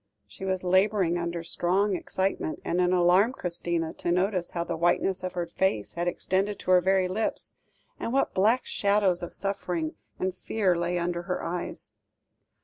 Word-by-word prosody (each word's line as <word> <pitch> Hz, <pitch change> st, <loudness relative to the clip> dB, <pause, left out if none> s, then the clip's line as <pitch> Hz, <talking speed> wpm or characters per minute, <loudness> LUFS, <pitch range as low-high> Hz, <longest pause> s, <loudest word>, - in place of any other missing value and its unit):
She 190 Hz, -, -9 dB
was 185 Hz, -1 st, -1 dB
labouring 185 Hz, -1 st, +3 dB
under 170 Hz, 0 st, -3 dB
strong 190 Hz, +4 st, +1 dB
excitement, 190 Hz, -2 st, -2 dB
and 175 Hz, +2 st, +1 dB
it 180 Hz, 0 st, +3 dB
alarmed 185 Hz, +7 st, +4 dB
Christina 170 Hz, -3 st, -2 dB
to 175 Hz, -, -1 dB
notice 180 Hz, 0 st, +1 dB
how 170 Hz, -, -2 dB
the 170 Hz, -1 st, -3 dB
whiteness 175 Hz, +3 st, +1 dB
of 185 Hz, 0 st, -4 dB
her 175 Hz, -1 st, -2 dB
face 170 Hz, -, -1 dB
had 175 Hz, +1 st, -2 dB
extended 195 Hz, +3 st, 0 dB
to 185 Hz, -, -2 dB
her 180 Hz, -1 st, +7 dB
very 190 Hz, 0 st, +3 dB
lips, 210 Hz, +5 st, -1 dB, 0.5 s
and -, -, -3 dB
what 270 Hz, +2 st, +1 dB
black 220 Hz, +7 st, +3 dB
shadows 200 Hz, -3 st, +2 dB
of 175 Hz, -, -6 dB
suffering 180 Hz, -5 st, -2 dB, 0.2 s
and 185 Hz, 0 st, -1 dB
fear 190 Hz, 0 st, 0 dB
lay 175 Hz, +1 st, -1 dB
under 175 Hz, 0 st, -1 dB
her 180 Hz, +1 st, -3 dB
eyes. 175 Hz, +1 st, -5 dB
180 Hz, 170 wpm, -27 LUFS, 175-190 Hz, 0.5 s, her